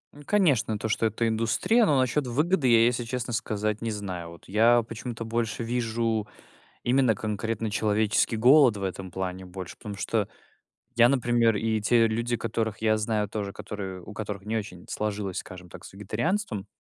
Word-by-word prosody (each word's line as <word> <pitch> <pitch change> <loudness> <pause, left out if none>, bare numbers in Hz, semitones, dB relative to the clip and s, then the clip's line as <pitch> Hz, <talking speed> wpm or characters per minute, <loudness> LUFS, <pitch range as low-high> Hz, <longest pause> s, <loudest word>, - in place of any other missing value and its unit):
Ну 145 - -12
конечно, 135 - +2
то, 110 +2 -3
что 115 +1 +2
это 110 +2 -1
индустрия, 115 - +2
но 145 - +3
насчет 130 +2 +1
выгоды, 150 +4 +1
я, 115 -1 +6
если 120 0 +1
честно 120 0 -4
сказать, 110 -1 -2
не 115 - -2
знаю. 95 -5 -5
Вот 85 0 -14
я 115 +4 +4
почему-то 115 +1 -6
больше 115 0 -2
вижу 115 -2 -1 0.6
именно 125 -2 +3
конкретно 110 +2 -3
человеческий 110 +1 +1
голод 125 0 +6
в 100 - -6
этом 95 -1 -4
плане, 95 0 -4
больше, 90 0 -8
потому 105 -3 -7
что 105 0 -1 0.7
я, 120 0 +7
например, 120 -3 +2
и 110 +1 0
те 115 +2 +4
люди, 115 +2 -1
которых 110 -1 -2
я 110 -1 +3
знаю 105 -1 -1
тоже, 100 -2 -4
которые, 95 -3 -6
у 90 - -11
которых 105 -2 -5
не 110 +1 -1
очень 90 -4 -7
сложилось, 105 -3 -3
скажем 90 -1 -8
так, - - -11
с - - -12
вегетарианством, 110 - -2
110 Hz, 175 wpm, -27 LUFS, 105-120 Hz, 0.7 s, я